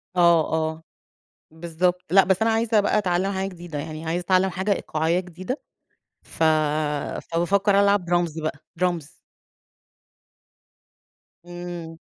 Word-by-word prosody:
آه، 170 Hz, -3 st, +4 dB
آه، 160 Hz, 0 st, -1 dB, 0.7 s
بالضبط، 175 Hz, +2 st, -1 dB
لأ 195 Hz, +1 st, +6 dB
بس 190 Hz, +2 st, +1 dB
أنا 225 Hz, -, +3 dB
عايزة 225 Hz, -1 st, +2 dB
بقى 205 Hz, +1 st, +1 dB
أتعلم 190 Hz, 0 st, 0 dB
حاجة 190 Hz, 0 st, -2 dB
جديدة 175 Hz, -4 st, -8 dB
يعني، 155 Hz, +2 st, -6 dB
عايزة 170 Hz, +2 st, -1 dB
أتعلم 185 Hz, +1 st, +3 dB
حاجة 190 Hz, +3 st, -1 dB
إيقاعية 165 Hz, 0 st, 0 dB
جديدة، 185 Hz, -, -6 dB, 0.7 s
ف 165 Hz, -, -3 dB, 0.9 s
فبافكر 195 Hz, +4 st, +2 dB
ألعب 200 Hz, -2 st, +3 dB
Drums 170 Hz, -2 st, 0 dB
بقى 155 Hz, -2 st, -3 dB, 0.2 s
Drums. 170 Hz, -5 st, -1 dB, 2.3 s
إمم. 175 Hz, -2 st, -7 dB
175 Hz, 120 wpm, -24 LUFS, 165-190 Hz, 2.3 s, لأ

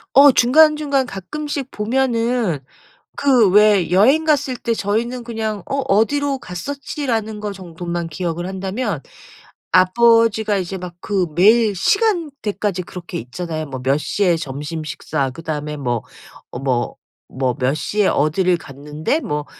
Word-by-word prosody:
어 280 Hz, +1 st, +9 dB
중간중간 285 Hz, +1 st, +4 dB
가끔씩 280 Hz, +6 st, -5 dB
보면은 230 Hz, -, 0 dB, 0.6 s
그 255 Hz, -7 st, +4 dB
왜 205 Hz, -3 st, +4 dB
여행 260 Hz, -, +4 dB
갔을 290 Hz, -4 st, +1 dB
때 235 Hz, -1 st, -1 dB
저희는 235 Hz, +4 st, -2 dB
그냥 220 Hz, -4 st, -3 dB
"어 275 Hz, -, -2 dB
어디로 275 Hz, +7 st, +2 dB
갔었지."라는 225 Hz, -, -4 dB
거 210 Hz, -1 st, -4 dB
정도만 175 Hz, -2 st, -5 dB
기억을 175 Hz, +1 st, -3 dB
한다면 195 Hz, -, -3 dB, 0.7 s
아버지가 220 Hz, +2 st, +4 dB
이제 190 Hz, +1 st, -3 dB
막 180 Hz, -1 st, -7 dB
그 195 Hz, -4 st, 0 dB
매일 215 Hz, +3 st, +5 dB
시간대까지 280 Hz, -, 0 dB
그렇게 175 Hz, 0 st, -7 dB
있잖아요. 155 Hz, +5 st, -5 dB
뭐 130 Hz, -1 st, -6 dB
"몇시에 165 Hz, +6 st, +1 dB
점심 150 Hz, +2 st, -5 dB
식사 140 Hz, -2 st, -3 dB
그다음에 150 Hz, +1 st, -5 dB
뭐, 120 Hz, -5 st, -1 dB, 0.6 s
뭐, 125 Hz, -3 st, -1 dB, 0.4 s
뭐 130 Hz, -2 st, -1 dB
몇시에 155 Hz, +10 st, 0 dB
어디를 175 Hz, +5 st, +2 dB
갔는데 150 Hz, -, -3 dB
뭐 150 Hz, -, -3 dB
200 Hz, 275 characters per minute, -19 LUFS, 165-245 Hz, 0.7 s, 어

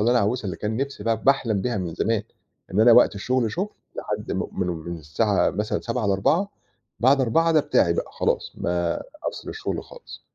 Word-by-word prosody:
اللي 115 Hz, +3 st, +3 dB
أنا 125 Hz, -, +4 dB
عاوزها 110 Hz, +3 st, 0 dB
اللي 95 Hz, -, -3 dB
كان 110 Hz, +1 st, -3 dB
نِفْسي 135 Hz, -5 st, -4 dB
ب 115 Hz, -, -1 dB
باحلم 115 Hz, -2 st, +2 dB
بيها 120 Hz, -3 st, -1 dB
من 85 Hz, -3 st, -4 dB
زمان، 110 Hz, -1 st, 0 dB, 0.5 s
إن 105 Hz, -, +2 dB
أنا 115 Hz, +1 st, +7 dB
وقت 120 Hz, -2 st, +6 dB
الشُغل 120 Hz, +3 st, 0 dB
شُغل 190 Hz, +4 st, -2 dB, 0.3 s
لحد -, -, -4 dB
م -, -, -1 dB
من 90 Hz, -, -2 dB
من 85 Hz, 0 st, -5 dB
الساعة 95 Hz, +7 st, +1 dB
مثلًا 105 Hz, +2 st, -2 dB
19:00 115 Hz, -2 st, -2 dB
ل16:00، 150 Hz, -, +2 dB, 0.5 s
بعد 135 Hz, +3 st, +5 dB
16:000 165 Hz, +7 st, +3 dB
ده 155 Hz, -, +5 dB
بتاعي 85 Hz, -10 st, +2 dB
بقى -, -, -3 dB
خلاص، -, -, -1 dB
ما 85 Hz, -1 st, -1 dB, 0.3 s
أفصِل -, -, -8 dB
الشُغل 440 Hz, -, -4 dB
خالص. -, -, -12 dB
110 Hz, 195 wpm, -24 LUFS, 95-130 Hz, 0.5 s, أنا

